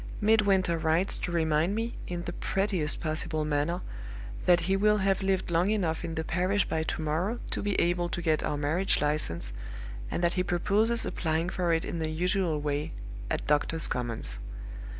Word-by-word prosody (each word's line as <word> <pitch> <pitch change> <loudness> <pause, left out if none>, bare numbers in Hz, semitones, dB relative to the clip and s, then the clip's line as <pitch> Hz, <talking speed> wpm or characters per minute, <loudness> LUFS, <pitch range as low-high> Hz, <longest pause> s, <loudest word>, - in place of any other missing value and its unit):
Midwinter 200 -5 +3
writes 165 +4 +2
to 180 - -3
remind 160 +2 +2
me, 230 +2 -2
in 175 -1 -4
the - - -4
prettiest 190 -6 0
possible 155 0 -2
manner, 150 +4 0 0.7
that 180 0 +6
he 190 +3 +1
will 210 +2 +4
have 195 -1 +1
lived 190 -2 0
long 170 +4 +3
enough 180 -7 0
in 165 -1 -4
the 160 - -1
parish 185 +5 +1
by 160 - 0
to 160 0 -2
morrow 175 +10 -1
to - - -1
be 205 -1 0
able 175 0 +1
to 175 - -3
get 160 -3 +1
our 145 - -1
marriage 155 +6 +1
license, 145 - 0 0.6
and 175 - -2
that 170 0 +3
he 185 - +1
proposes 205 +6 +2
applying 160 +1 -1
for 180 -2 0
it 165 0 +1
in 170 - -4
the 160 -1 -1
usual 175 0 +1
way 145 0 -2 0.4
at - - -2
Doctors' 150 +2 +3
Commons. 115 - -3
170 Hz, 180 wpm, -29 LUFS, 155-190 Hz, 0.7 s, that